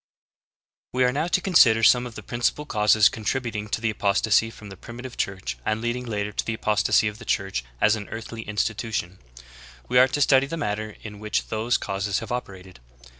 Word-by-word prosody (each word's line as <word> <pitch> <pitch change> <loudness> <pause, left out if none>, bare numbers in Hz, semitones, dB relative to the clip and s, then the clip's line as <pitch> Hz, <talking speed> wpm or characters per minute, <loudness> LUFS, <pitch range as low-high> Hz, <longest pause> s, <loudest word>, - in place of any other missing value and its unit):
1. 125 - -3
We 130 - +5
are - - +2
now 150 +5 -1
to 175 - +2
consider 120 - +5
some 125 +2 +5
of 115 - -12
the - - -8
principal 120 +5 -1
causes 105 -4 +4
contributing 110 -1 -3
to 115 +2 -1
apostasy 105 +2 +2
from 105 -2 -12
the 95 - -9
Primitive 120 +5 -9
Church 90 -12 -3
and 110 - -1
leading 120 +2 -3
later 105 -2 -2
to - - -2
the 110 - -3
apostasy 105 0 +2
of 105 +1 -5
the - - -10
Church 95 - -1 0.2
as 105 +1 +4
an 105 -2 -7
earthly 115 0 -7
in 105 -1 -7
stitution; 110 +1 -1
and 90 +2 -17 0.7
we 125 - +5
are 130 - +7
to 140 +3 -3
study 135 -1 +4
the 165 - -5
manner 105 -5 -3
in 105 -2 -8
which 105 0 -2
those 110 +3 0
causes 100 +1 -2
have 115 -1 -5
operated. 95 - -6
110 Hz, 205 wpm, -24 LUFS, 105-125 Hz, 0.7 s, are